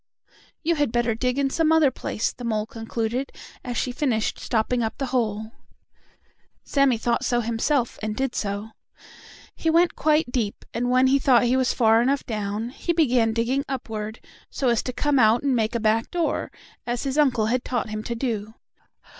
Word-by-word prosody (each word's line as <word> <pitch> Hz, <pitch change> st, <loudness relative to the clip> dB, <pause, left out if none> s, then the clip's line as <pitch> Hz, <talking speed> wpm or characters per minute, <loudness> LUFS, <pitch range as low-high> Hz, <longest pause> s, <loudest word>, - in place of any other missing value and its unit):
"You 335 Hz, +1 st, +2 dB
had 290 Hz, -5 st, +1 dB
better 240 Hz, -1 st, +1 dB
dig 250 Hz, +3 st, -1 dB
in 275 Hz, -1 st, +1 dB
some 320 Hz, 0 st, +2 dB
other 315 Hz, -4 st, +5 dB
place," 230 Hz, -, -3 dB
the 245 Hz, -, -10 dB
mole 215 Hz, -2 st, -1 dB
concluded, 230 Hz, +3 st, -3 dB, 0.3 s
as 245 Hz, -2 st, -4 dB
she 250 Hz, -, -1 dB
finished 245 Hz, -4 st, -1 dB
stopping 240 Hz, +2 st, 0 dB
up 220 Hz, -1 st, -2 dB
the 275 Hz, -, -2 dB
hole. 220 Hz, -3 st, -1 dB, 1.1 s
Sammie 275 Hz, -4 st, +2 dB
thought 235 Hz, +1 st, 0 dB
so 240 Hz, -, +1 dB
himself, 235 Hz, +3 st, 0 dB
and 215 Hz, 0 st, -3 dB
did 265 Hz, 0 st, -1 dB
so. 205 Hz, +1 st, -3 dB, 0.8 s
He 325 Hz, -, -1 dB
went 335 Hz, +2 st, +3 dB
quite 305 Hz, -3 st, +2 dB
deep, 225 Hz, -5 st, -2 dB
and 245 Hz, +2 st, -1 dB
when 255 Hz, +1 st, +4 dB
he 270 Hz, +1 st, +4 dB
thought 255 Hz, -3 st, +4 dB
he 245 Hz, +1 st, +2 dB
was 260 Hz, -1 st, +2 dB
far 225 Hz, -1 st, +4 dB
enough 275 Hz, +3 st, +1 dB
down, 210 Hz, +1 st, -3 dB
he 340 Hz, +6 st, -2 dB
began 250 Hz, -8 st, +3 dB
digging 240 Hz, +5 st, 0 dB
upward, 220 Hz, -4 st, -5 dB, 0.3 s
so 265 Hz, -, 0 dB
as 235 Hz, -2 st, +2 dB
to 255 Hz, -, -4 dB
come 285 Hz, +2 st, +1 dB
out 225 Hz, +2 st, +4 dB
and 275 Hz, -2 st, +2 dB
make 225 Hz, 0 st, 0 dB
a -, -, +1 dB
back 220 Hz, +1 st, +1 dB
door, 340 Hz, -3 st, -1 dB, 0.4 s
as 240 Hz, 0 st, -2 dB
his 275 Hz, +1 st, -1 dB
uncle 250 Hz, -7 st, +3 dB
had 245 Hz, +3 st, 0 dB
taught 240 Hz, -3 st, -2 dB
him 215 Hz, 0 st, -3 dB
to 235 Hz, -, -3 dB
do. 225 Hz, -3 st, -3 dB
240 Hz, 190 wpm, -24 LUFS, 225-270 Hz, 1.1 s, other